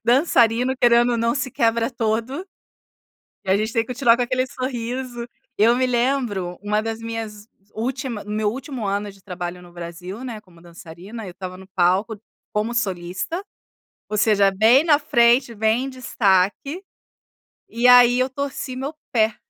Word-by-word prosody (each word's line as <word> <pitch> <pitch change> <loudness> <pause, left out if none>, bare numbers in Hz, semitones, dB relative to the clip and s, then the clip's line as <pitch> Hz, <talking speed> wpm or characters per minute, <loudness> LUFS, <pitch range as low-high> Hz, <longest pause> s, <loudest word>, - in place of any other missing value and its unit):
dançarino, 245 -1 +3
querendo 240 0 +5
ou - - +1
não, 230 +1 +1
se 275 -2 -2
quebra 230 +1 +1
todo. 235 - -2 1.0
E - - -4
a - - +5
gente 215 +2 -1
tem 230 -1 +1
que 250 - -5
continuar 235 -1 +4
com 245 - +1
aquele 255 +1 0
sorriso. 245 -1 -4 0.3
Eu 230 +3 +5
me 255 +1 +2
lembro 240 -8 -1
uma 210 +1 +1
das 225 0 -4
minhas 225 -2 -6 0.3
última 250 -1 -3
meu 210 0 -1
último 260 -2 -6
ano 200 +1 -2
de 195 - -20
trabalho 180 -1 -6
no 175 - -15
Brasil, 175 +5 -8
né, 235 -4 -6
como 175 -4 -21
dançarina, 175 +6 -10
eu - - -7
estava 185 0 -8
no 190 0 -13
palco 190 +4 +1 0.3
como 215 +3 -1
solista, 190 - -3 0.7
ou 210 - -2
seja, 205 -2 +4
bem 225 +9 +5
na 300 -3 +5
frente, 240 -4 +3
bem 220 +4 +1
em - - -4
destaque, 245 - 0 0.9
e 235 +2 0
aí 245 0 +7
eu 255 +1 +2
torci 270 -1 -4
meu 270 +3 -4 0.2
pé. 220 -2 +2
230 Hz, 165 wpm, -22 LUFS, 205-250 Hz, 1.0 s, aí